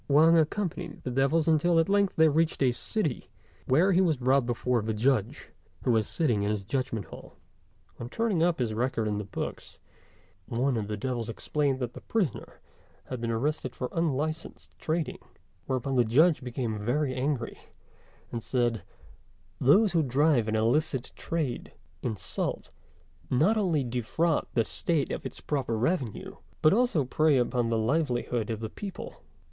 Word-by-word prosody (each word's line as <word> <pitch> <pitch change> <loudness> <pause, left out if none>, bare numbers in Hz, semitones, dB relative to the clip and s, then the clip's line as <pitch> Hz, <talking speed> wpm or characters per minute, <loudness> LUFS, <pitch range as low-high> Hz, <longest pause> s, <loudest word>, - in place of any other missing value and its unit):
Wang 155 +4 +6
accompanied 170 +1 -1
the 130 - -3
devils 140 +5 +2
until 165 +2 +3
at 165 - +3
length 200 -1 +2
they 160 0 +6
reached 155 -1 +1
a 130 - +4
city, 155 - -2 0.4
where 165 +10 +4
he 185 0 +4
was 165 -6 +2
brought 130 0 +2
before 120 0 0
the 110 0 -2
Judge, 115 -2 0 0.3
who 125 - +2
was 110 -2 +2
sitting 120 -11 +1
in 100 - 0
his 105 -2 -1
Judgment 115 -1 -2
hall. - - -12 0.6
On 120 - -6
turning 220 - 0
up 170 0 +3
his 120 -4 -1
record 115 -1 -1
in 105 -1 -1
the - - -3
books, 100 - -6 0.7
one 125 +3 0
of 110 -3 -2
the 105 0 -3
devils 120 0 -3
explained 140 +3 -1
that 125 -2 -4
the - - -10
prisoner 195 - -2 0.5
had 130 -2 -4
been 115 - -2
arrested 130 +3 -1
for 125 - -3
unlicensed 155 0 -3
trading; 160 0 -2 0.5
whereupon 130 +1 -1
the 120 - +5
Judge 150 +9 +4
became 120 -3 -3
very 130 +4 0
angry, 130 -2 -2 0.7
and 115 - -3
said, 120 -3 0 0.8
"Those 190 - +5
who 170 -2 +3
drive 135 -3 +2
an 110 - 0
illicit 130 +4 +1
trade 155 -8 -3 0.3
in 115 -3 -2
salt, 95 - -4 0.6
not 160 - +3
only 175 -9 +1
defraud 125 +7 0
the 115 - +4
State 155 +4 0
of - - -3
its - - -10
proper 130 -6 -1
revenue, 125 - -2 0.3
but 155 - +6
also 220 - +2
prey 155 +2 +3
upon 120 -1 +1
the 115 - +1
livelihood 120 -2 0
of 110 -1 -3
the 110 - -2
people. 195 - -8
130 Hz, 165 wpm, -28 LUFS, 120-160 Hz, 0.8 s, Wang